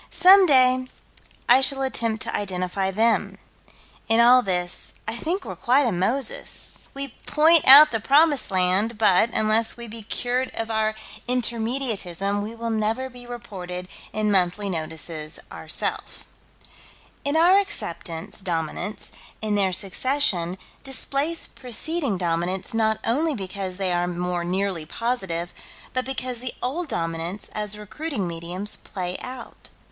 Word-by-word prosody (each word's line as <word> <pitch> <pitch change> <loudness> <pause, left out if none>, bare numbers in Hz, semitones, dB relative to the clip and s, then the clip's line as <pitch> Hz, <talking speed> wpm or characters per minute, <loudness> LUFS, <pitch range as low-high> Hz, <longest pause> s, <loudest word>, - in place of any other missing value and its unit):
Some 380 +1 +6
day 255 -2 +4 0.6
I 265 - +6
shall 270 0 +3
attempt 230 -4 0
to - - -3
identify 190 -1 -2
them. 225 +4 +1 0.7
In 225 +1 +4
all 245 +2 +7
this, 180 -4 -1
I 225 - -2
think 345 +10 -3
we're - - -6
quite 265 +4 +2
a 235 - +1
Moses. 255 - -1 0.2
We 275 0 -2 0.2
point 320 +1 +5
out 290 +3 +10
the 225 - -1
Promised 290 +5 +3
Land, 190 +4 +2
but, 215 0 +4
unless 220 +1 +1
we 235 0 -7
be 225 +1 -7
cured 245 +4 -2
of 225 0 -3
our 220 0 0 0.3
Intermediatism, 225 -5 0 0.2
will 230 0 -3
never 225 +4 -1
be 245 0 -12
reported 185 -7 -7 0.2
in 215 -1 0
Monthly 195 +1 +1
Notices, 160 -1 -1
ourself. - - -3 1.0
In 285 +3 0
our 360 +4 +6
acceptance, 170 - -4
Dominants, 175 +3 -4 0.3
in 215 -1 -2
their 195 -2 +2
succession, 190 -2 +1 0.3
displace 275 +4 0
preceding 265 - -3
Dominants 175 +3 -2
not 220 -1 +1
only 295 +6 +1
because 190 -2 -5
they 190 -2 0
are 175 0 0
more 180 0 -2
nearly 185 -1 -1
positive, 190 -8 -2 0.4
but 255 0 -1
because 255 -2 -2
the 250 0 -4
old 310 +8 -2
Dominants, 165 - -3
as 210 -1 -1
recruiting 210 - -4
mediums, 175 +4 -3
play 180 -2 -5
out. 250 -1 -10
220 Hz, 135 wpm, -23 LUFS, 185-255 Hz, 1.0 s, out